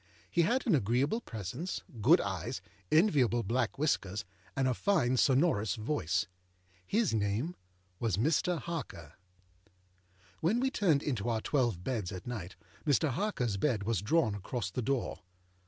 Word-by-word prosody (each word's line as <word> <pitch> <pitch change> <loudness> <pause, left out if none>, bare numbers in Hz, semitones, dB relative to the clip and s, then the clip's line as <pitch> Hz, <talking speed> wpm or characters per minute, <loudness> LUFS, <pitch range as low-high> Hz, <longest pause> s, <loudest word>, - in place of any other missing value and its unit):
He 170 - +3
had 240 +10 +1
an 220 - +3
agreeable 135 - +2
presence, 115 - -5 0.2
good 160 - +6
eyes, 95 -4 -3 0.3
enviable 140 - +4
black 115 +2 0
whiskers, 105 -9 0 0.3
and 135 -1 +2
a 130 - +2
fine 140 - +2
sonorous 130 - +3
voice. 110 - 0 0.6
His 220 - +1
name 110 - 0 0.4
was 110 -6 0
Mr. 155 - +2
Harker. 140 - -6 1.3
When 195 +9 +2
we 265 +1 +1
turned 165 - +2
into 120 -6 -1
our 115 -1 +1
twelve 120 - 0
beds 110 -7 -2
at 90 -1 -7
night, 105 -8 -5 0.3
Mr. 150 0 +2
Harkerâs 125 - -1
bed 115 -7 +1
was 110 -3 0
drawn 115 0 +2
across 100 0 -4
the 125 - -2
door. 130 -5 -1
125 Hz, 140 wpm, -32 LUFS, 105-160 Hz, 1.3 s, good